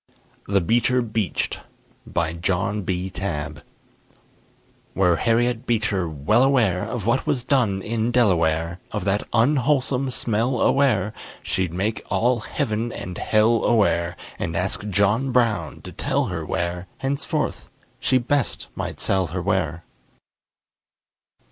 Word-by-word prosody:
THE 100 -1 +2
BEECHER 120 +6 +2
BEACHED 110 -6 -2 0.5
BY 85 -1 -1
JOHN 95 +4 -1
B. 95 0 -2
TABB 75 -6 -4 1.3
Were 90 -3 +3
Harriet 115 +2 +1
Beecher 105 -6 0
well 80 - +2
aware 120 -10 +3
Of 115 -5 -4
what 120 +4 +1
was 125 - 0
done 115 -8 +1
in 115 +1 -1
Delaware, 85 -7 +2
Of - - -3
that 100 +1 +1
unwholesome 130 +1 +2
smell 120 +1 0
aware, 110 -8 +2 0.3
She'd 95 -3 -1
make 100 +6 -1
all 120 +1 +2
heaven 115 -1 -2
and 90 -4 -6
hell 110 +1 +2
aware, 85 -6 +2 0.2
And 85 - -2
ask 95 +3 -2
John 105 +7 +2
Brown 115 -4 +1
to - - -8
tell - - 0
her 80 -2 -3
where 90 0 -2
Henceforth 140 +1 -2 0.3
she 130 - +3
best 130 +2 0
might - - -4
sell 95 -2 +1
her 90 +3 -4
ware. 85 -4 0
105 Hz, 125 wpm, -23 LUFS, 90-120 Hz, 1.3 s, Were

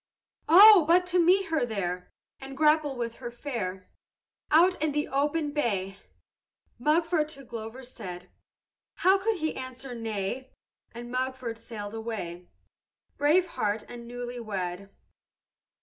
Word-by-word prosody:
"'Oh, 395 +2 +10
but 355 +2 +5
to 360 -1 +5
meet 370 +2 +3
her 320 -4 +1
there, 180 -6 -3 0.3
And 270 0 -9
grapple 300 -2 +3
with 235 -1 -4
her 240 -2 -6
fair, 230 -8 -5 0.6
Out 350 +3 +4
in 310 -2 0
the 295 0 -1
open 295 +2 0
bay!' 200 -9 -2 0.8
Mugford 310 +3 +2
to 275 -3 -10
Glover 235 +1 -8
said. 185 -8 -8 0.8
How 385 +1 +6
could 440 +3 0
he 315 -3 -2
answer 260 0 -7
nay? 225 +2 -4 0.4
And 240 +1 -9
Mugford 255 -2 -3
sailed 215 -3 -7
away, 205 -6 -6 0.7
Brave 310 +6 +4
heart 210 -5 -2
and 235 -1 -10
newly 245 0 -6
wed. 195 -3 -4
250 Hz, 130 wpm, -28 LUFS, 220-305 Hz, 0.8 s, Oh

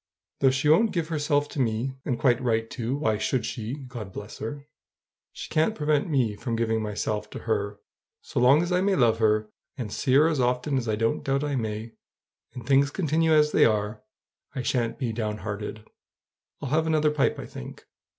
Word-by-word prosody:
Though 135 - +5
she 130 +3 0
won't 195 +8 +4
give 170 -3 -1
herself 145 -2 +1
to - - -6
me 120 +2 -1
and 125 -4 -1
quite 120 0 +2
right, 115 -2 0
too! 125 +2 -3
why 110 -8 0
should 120 +1 0
she? 115 +1 -4
God 125 -8 -8
bless 105 +3 -8
her! 140 +6 -6 0.7
she - - -8
can't 160 +8 +1
prevent 150 -1 +1
me 125 -8 +1
from 115 +3 -3
giving 115 -1 0
myself 105 0 -3
to - - -7
her. 105 -2 -1 0.4
So - - -3
long 135 +6 +5
as 175 - -3
I 180 0 +2
may 195 0 +2
love 115 -5 +3
her, 105 -1 +2 0.3
and 115 -6 -5
see 130 - 0
her 150 +3 +6
as 160 -4 0
often 125 +3 +1
as 120 -3 -4
I 110 - +1
don't 115 +1 0
doubt 135 +1 0
I 145 -1 -1
may, 110 -1 -3 0.6
and 125 -3 -8
things 140 +2 +4
continue 160 0 +1
as 150 -1 +4
they - - +4
are, 105 0 +1 0.5
I 130 - -2
sha'n't 120 -2 0
be 120 -4 -2
down 105 -2 -2
hearted. 105 +1 -6 0.8
I'll 135 - -3
have 160 +3 +1
another 155 -1 +3
pipe, 150 -2 +1
I - - -6
think." 60 - -10
125 Hz, 200 wpm, -26 LUFS, 110-145 Hz, 0.8 s, her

